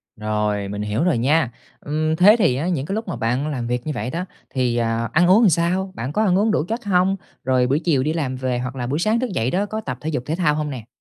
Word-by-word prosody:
Rồi, 105 -1 -1
mình 105 +1 -4
hiểu 105 +8 -1
rồi 175 -9 +2
nha. 135 +1 +2 0.3
Ừm, 155 +2 -1
thế 205 +6 +7
thì 125 - +3
á 150 +7 -2
những 145 -6 -1
cái 195 - -3
lúc 220 -1 -4
mà 175 - -3
bạn 125 +6 -1
làm 125 -6 -3
việc 125 +3 -2
như - - 0
vậy 125 - -3
đó, 170 +5 -3 0.2
thì, 125 -2 0
à, 115 -1 0
ăn 175 +1 +4
uống 190 +4 +6
làm 210 - +6
sao? 180 +4 0
Bạn 125 +4 -4
có 215 - +2
ăn 185 -3 +3
uống 215 +2 +2
đủ 150 - +1
chất 225 0 -4
hông? 190 0 +2 0.3
Rồi 125 -1 +2
buổi 140 +4 +2
chiều 145 -7 +1
đi 155 +2 0
làm 140 -6 -2
về 125 -1 -2
hoặc 125 +1 -4
là 120 -2 -3
buổi 145 +5 -1
sáng 215 +5 +2
thức 255 -2 -2
dậy 125 -8 -1
đó 195 +3 +1
có 215 +1 -4
tập 125 - -5
thể 155 - -3
dục 125 -5 -2
thể 160 - -1
thao 155 -5 +2
hông 150 -1 -2
nè? 120 -5 -7
150 Hz, 290 wpm, -21 LUFS, 125-180 Hz, 0.3 s, thế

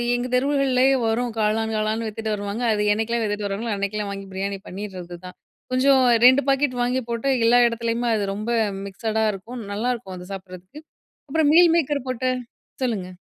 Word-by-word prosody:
எங்க 245 +1 -2
தெருவுகள்லயே 270 -1 +2 0.2
வரும். 235 +2 0
காளான் 220 +1 0
காளான் 215 +1 -1
வித்துட்டு 220 0 -3
வருவாங்க. 205 +3 -4
அது 210 0 0
என்னைக்கலாம் 225 +2 -1
வித்துட்டு 205 -1 -2
வருவாங்களோ? 210 +3 -3
அன்னைக்கெல்லாம் 200 +1 -3
வாங்கி, 195 0 -7
பிரியாணி 195 +1 -3
பண்ணிடுறது 185 -3 -7
தான். 180 - -10 0.4
கொஞ்சம் 265 +1 +4 0.2
2 260 +2 +7
பாக்கெட் 270 -2 +1
வாங்கி 250 +2 0
போட்டு, 235 +3 -2 0.2
எல்லா 245 +1 +5
இடத்துலயுமே 235 +1 -2
அது 205 - -1
ரொம்ப 215 +3 -5 0.4
மிக்சடா 220 +3 -2
இருக்கும். 230 +5 -8
நல்லாருக்கும். 225 -3 -3
அது 180 0 -10
சாப்பிடுறதுக்கு. 185 - -10 0.5
அப்புறம் 295 0 +2
மீல் 345 -1 +7
மேக்கர் 290 -4 -1
போட்டு. 255 +1 -1 0.5
சொல்லுங்க. 200 -7 -2
225 Hz, 160 wpm, -23 LUFS, 205-250 Hz, 0.5 s, 2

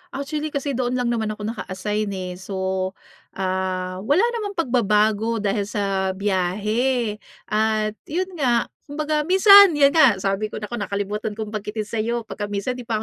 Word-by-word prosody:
Actually, 295 +2 -3
kasi 280 0 -1
doon 250 -1 -1
lang 245 -1 0
naman 225 -2 -1
ako 210 - -9
naka-assign, 210 -1 -3
eh. 185 -1 -5
So, 190 -1 -2 0.4
ah, 185 -1 -2
wala 285 - +2 0.2
namang 405 -2 -5
pagbabago 220 - +1
dahil 200 0 0
sa 195 -2 -1
biyahe. 210 +5 0 0.3
At 215 0 +1 0.2
yun 365 +5 -2
nga, 240 -4 +2 0.2
kumbaga 300 +1 -1
minsan 390 -1 +8
'yan 280 -1 +5
nga 285 -8 +6
sabi 195 +2 0
ko, - - -10
naku, 240 +2 -4
nakalimutan 205 +2 -3
kong 215 -1 -5
banggitin 215 0 -4
sa'yo, 230 +2 -2
pagka 210 -1 -5
minsan 205 +4 -2
'di 245 -2 -9
pa 220 -2 -1
215 Hz, 155 wpm, -22 LUFS, 200-255 Hz, 0.4 s, minsan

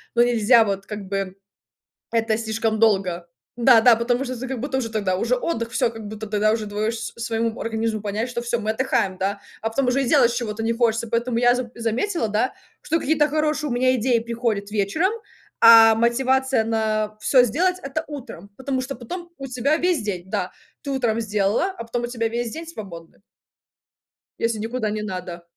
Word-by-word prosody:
Ну, 240 - +6
нельзя 235 -1 +5
вот 195 -1 -3
как 205 -2 -6
бы 195 -1 -3 0.8
это 225 -1 +1
слишком 220 0 -1
долго. 190 -6 +2 0.3
Да-да 240 -1 +6
потому 240 +2 0
что 255 -1 -4
ты 260 - -5
как 260 -3 -4
будто 265 +1 -2
уже 230 -3 -3
тогда 200 -4 0
уже 230 +6 +1
отдых 230 -4 -2
всё 245 -2 +1
как 225 -2 -9
будто 215 +1 -7
тогда 215 0 +2
уже 220 -1 -2
двоешь 215 +2 -2
с 225 - -6
своему 225 0 -1
организму 225 -1 -2
понять 215 +3 -2
что 240 - -3
всё 235 0 -1
мы 215 0 -1
отдыхаем, 220 -5 0
да. 200 +2 -2 0.2
А 225 - 0
потом 255 +3 0
уже 270 +2 +2
делать 245 -2 +4
чего-то 225 -3 -3
не 225 +1 +1
хочется. 230 -1 +1
Поэтому 235 +1 0
я 245 0 +4
зам 250 -2 -4
заметила, 235 - -1
да, 215 +5 0 0.3
что 325 +2 0
какие-то 300 0 +2
хорошие 305 0 0
у - - -1
меня 255 +1 +3
идеи 240 0 +2
приходят 230 -3 -2
вечером, 215 - +1 0.5
а 225 -1 +9
мотивация 260 +1 +2
на 215 -1 -1
всё 250 +3 +5
сделать- 360 - +1
это 275 +3 -3
утром. 255 - -9
Потому 265 -1 -2
что 270 +2 -5
потом 345 +9 -7
у 270 - -6
тебя 255 +4 +1
весь 350 -7 +1
день, 200 -4 -3
да, 200 -4 -2 0.3
ты 280 - -5
утром 235 -4 0
сделала, 210 - +1
а - - -4
потом 235 +1 -3
у - - +1
тебя 230 -2 -2
весь 235 +1 -3
день 330 +1 -7
свободный. 170 -4 -10 1.2
Если 230 -1 -1
никуда 225 0 -2
не 210 0 -3
надо. 180 -4 -6
230 Hz, 190 wpm, -23 LUFS, 215-255 Hz, 1.2 s, а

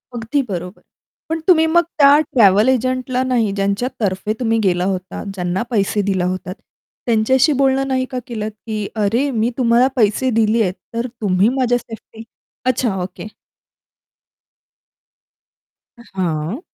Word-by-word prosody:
अगदी 235 +5 -1
बरोबर. 180 +1 -6 0.5
पण 325 0 -1
तुम्ही 320 -3 +5
मग 345 +2 +4 0.2
त्या 285 0 +6
ट्रॅव्हल 215 -6 +4
एजंटला 255 0 0
नाही 240 -5 +1
ज्यांच्यातर्फे 200 0 -1
तुम्ही 225 -2 +1
गेला 180 -3 +1
होतात, 185 -1 -4
ज्यांना 180 +2 -2
पैसे 205 -2 0
दिला 190 -2 0
होतात. 185 0 -3 0.5
त्यांच्याशी 255 +6 +3
बोलणं 270 0 +2
नाही 260 -1 0
का 255 - -2
केलंत, 215 -2 -4
की 215 -1 -5
"अरे 225 +7 +1
मी 230 0 0
तुम्हाला 240 +1 +4
पैसे 230 +3 +2
दिले 225 +1 +2
आहेत 185 -1 -1 0.2
तर 235 +2 -1
तुम्ही 195 +2 +2
माझ्या 245 -1 +2
सेफ्टी" 225 -1 -11 0.4
अच्छा. 250 -5 0
ओके. 180 +3 -8 2.7
अ, - - -14
हां. 170 - -2
225 Hz, 135 wpm, -18 LUFS, 195-255 Hz, 2.7 s, त्या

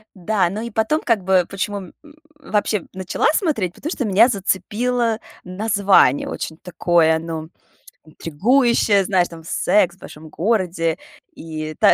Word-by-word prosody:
Да, 185 0 0
но 205 +4 -5
и 235 - -5
потом, 225 +9 0
как 225 -6 +1
бы, 185 -2 +3
почему, 195 +1 -3
м, 185 -3 -11 0.5
вообще 210 - -1
начала 185 -1 -1
смотреть- 235 - -1
потому 315 - -6
что 260 - -2
меня 215 +4 +5
зацепило 225 +3 -1 0.2
название. 195 - +2
Очень 160 - -5
такое, 170 -2 +1
ну, 160 -1 -6 0.6
интригующее, 205 - +2
знаешь, 180 -2 +2
там 165 -1 -12
"Секс 180 +2 +1
в - - -30
большом 155 -2 -12
городе" 175 -3 -1 0.4
и 155 -1 -6
та - - +6
190 Hz, 140 wpm, -20 LUFS, 170-220 Hz, 0.6 s, та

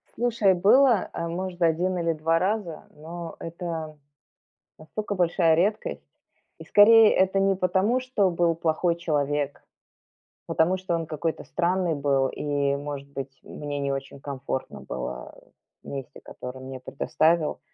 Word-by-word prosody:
Слушай, 225 -4 +2
было, 215 +5 +4
э, 170 0 -3
может, 180 +1 -5
1 175 +3 +2
или 170 -1 0
2 165 +2 +1
раза, 185 -5 -2
но 165 +2 -8
это 165 -2 -6 0.8
настолько 205 +6 -5
большая 170 -2 +3
редкость. 205 +6 -1 0.6
И - - -10
скорее 220 +1 +7
это 190 +1 +2
не 195 0 +3
потому, 190 +7 +1
что 250 -7 +1
был 170 -1 +1
плохой 165 +1 +1
человек, 145 -3 -1 0.8
потому, 175 +4 +2
что 185 -2 -3
он 165 -1 -2
какой-то 155 +1 -3
странный 175 -1 0
был, 140 -2 +1
и, 140 -1 -1
может 140 -1 -6
быть, 135 -1 -7
мне 145 -1 -6
не 140 0 -1
очень 135 0 -6
комфортно 135 -1 -5
было 60 0 -6 0.5
в - - -15
месте, 135 -2 -7
которое 125 +1 -9
он 130 - -10
мне 130 -1 -7
предоставил. 155 +4 0
165 Hz, 140 wpm, -25 LUFS, 145-185 Hz, 0.8 s, скорее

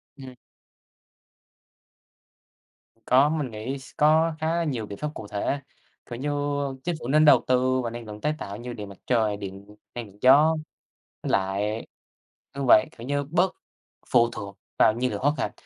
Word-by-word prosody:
Ừm. 130 -2 -11 2.7
Có 135 +4 +5
mình 150 -5 -2
nghĩ 110 +6 -5
s 135 - -13
có 160 +2 +4
khá 160 +1 0
là 170 - +1
nhiều 130 -9 -2
biện 100 -1 -8
pháp 150 0 -3
cụ 105 - -8
thể, 105 +8 -2 0.5
kiểu 120 - -6
như, 145 +3 -2 0.5
chính 175 -1 -1
phủ 120 - -7
nên 155 +4 +4
đầu 150 - +7
tư 130 0 +2
vào 115 - -3
năng 120 0 -7
lượng 105 0 -9
tái 150 +1 +1
tạo 100 -6 -6
như 120 +2 -7
điện 105 -3 -7
mặt 100 - -12
trời, 110 -4 +2
điện 100 +1 -9 0.2
năng 120 -2 -5
lượng 100 0 -18
gió 150 +5 +6 0.7
với - - -3
lại 100 +3 -1 0.7
đúng 140 -1 -2
vậy, 105 - +7
kiểu 115 - -8
như, 145 0 0
bớt 175 +6 +1 0.5
phụ 120 -1 +4
thuộc 100 -3 -8 0.2
vào 110 - +6
nhiên 125 +2 -1
liệu - - -3
hoá 145 +3 +3
thạch. - - -1
125 Hz, 180 wpm, -25 LUFS, 105-145 Hz, 2.7 s, đầu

